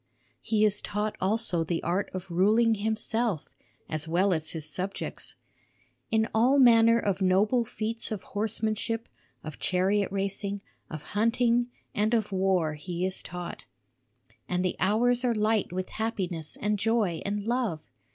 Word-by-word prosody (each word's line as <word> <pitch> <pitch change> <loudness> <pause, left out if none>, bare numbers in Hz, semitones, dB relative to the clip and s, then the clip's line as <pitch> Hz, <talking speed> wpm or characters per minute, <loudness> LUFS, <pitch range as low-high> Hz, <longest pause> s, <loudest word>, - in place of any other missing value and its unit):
He 215 -1 +2
is 210 -1 +3
taught 210 +1 -2
also 190 -3 +3
the 165 0 -2
art 180 +4 0
of 185 -1 -7
ruling 215 +6 +4
himself 220 -3 -1 0.4
as 155 +1 -1
well 180 +4 +2
as 160 -2 -2
his 155 -2 -4
subjects. 185 +5 -4 0.7
In 220 0 +2
all 245 +5 +4
manner 230 -3 +6
of 200 -4 -1
noble 205 +6 +3
feats 225 0 -3
of 210 -4 -4
horsemanship, 220 +2 -2 0.4
of 155 -2 -8
chariot 195 +2 +1
racing, 200 0 -2 0.3
of 155 -2 -7
hunting 235 +3 +2 0.2
and 215 +3 +1
of 215 -3 -1
war 185 -4 +1
he 175 +3 -4
is 190 0 -3
taught. 175 -1 -7 0.8
And 180 +1 0
the 180 - 0
hours 240 +6 +3
are 240 -2 +2
light 215 -2 +1
with 185 +1 -3
happiness 185 -8 -3
and 210 0 0
joy 210 -6 +1
and 205 0 -3
love. 230 -10 -2
205 Hz, 145 wpm, -28 LUFS, 185-225 Hz, 0.8 s, manner